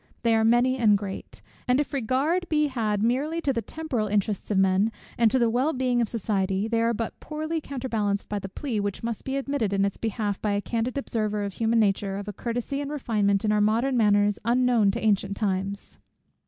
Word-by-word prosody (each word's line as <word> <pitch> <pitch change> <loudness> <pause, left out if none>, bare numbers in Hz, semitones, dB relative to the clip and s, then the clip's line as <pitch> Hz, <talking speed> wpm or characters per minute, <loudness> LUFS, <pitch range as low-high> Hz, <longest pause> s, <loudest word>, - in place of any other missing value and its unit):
They 230 -1 +3
are 220 0 +3
many 240 +3 +3
and 210 -3 +5
great; 190 - -7 0.2
and 250 +2 +3
if 295 - -2
regard 280 +8 0
be 300 -2 +2
had 215 -5 -1
merely 280 +8 0
to 280 -4 +1
the 230 - -1
temporal 270 -7 -3
interests 205 0 -1
of 205 - +1
men, 190 +3 +3 0.2
and 230 -2 +4
to 260 - +1
the 240 -2 +3
well 255 +7 +1
being 250 -2 +1
of 225 - 0
society, 195 -2 -1
they 230 0 +1
are 230 0 +2
but 230 0 -4
poorly 310 +1 -3
counterbalanced 225 -8 -2
by 205 - -2
the 195 - -7
plea, 230 +2 -3
which 205 +1 -3
must 230 -2 -3
be 270 +1 -2
admitted 275 -7 -1
in 195 0 +2
its 200 - -2
behalf 215 -3 -2
by 210 -1 0
a 200 - +1
candid 235 +4 -2
observer 215 -6 -1
of 200 -1 -4
human 230 +2 +1
nature, 195 -2 +1
of 200 +1 -6
a 210 - -4
courtesy 245 +6 -3
and 285 - -4
refinement 215 -8 0
in 210 - +2
our 210 0 +3
modern 230 +6 +2
manners 205 -2 +3
unknown 240 -2 +3
to 195 - -1
ancient 200 -1 +1
times. 195 -1 -3
225 Hz, 215 wpm, -26 LUFS, 205-255 Hz, 0.2 s, and